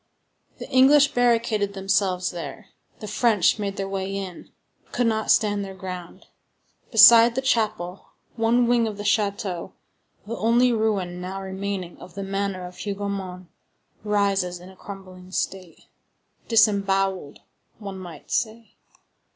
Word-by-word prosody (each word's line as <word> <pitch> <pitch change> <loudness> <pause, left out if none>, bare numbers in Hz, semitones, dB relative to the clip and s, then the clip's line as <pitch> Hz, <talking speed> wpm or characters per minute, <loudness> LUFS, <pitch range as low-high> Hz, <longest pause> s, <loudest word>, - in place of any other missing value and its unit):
The - - -8
English 280 +2 +6
barricaded 230 -4 +1
themselves 190 -2 0
there; 180 +4 -8 0.3
the 215 - -7
French 220 -4 +2
made 200 -1 -3
their 195 - -3
way 195 0 -3
in, 190 -3 -7 0.3
but - - -30
could 245 - +1
not 220 -1 0
stand 205 -2 +3
their 195 -1 -8
ground. 180 -2 -8 0.7
Beside 230 +1 +8
the 265 - 0
chapel, 215 -8 -1 0.3
one 235 +1 +2
wing 235 -1 +2
of 210 -2 -5
the 205 - -6
château, 200 -3 -1 0.5
the 230 +3 -5
only 240 +2 +3
ruin 200 -5 -1
now 190 +2 -5
remaining 190 -2 -5
of 180 - -13
the 200 - -4
manor 195 -1 -3
of 180 0 -11
Hougomont, 195 -3 -5 0.5
rises 200 -4 0
in 180 +1 -13
a - - -17
crumbling 185 -2 -11
state,—disembowelled, 195 0 -1 0.4
one 195 -3 -8
might 175 -5 -11
say. 225 0 -2
200 Hz, 135 wpm, -24 LUFS, 185-220 Hz, 0.7 s, Beside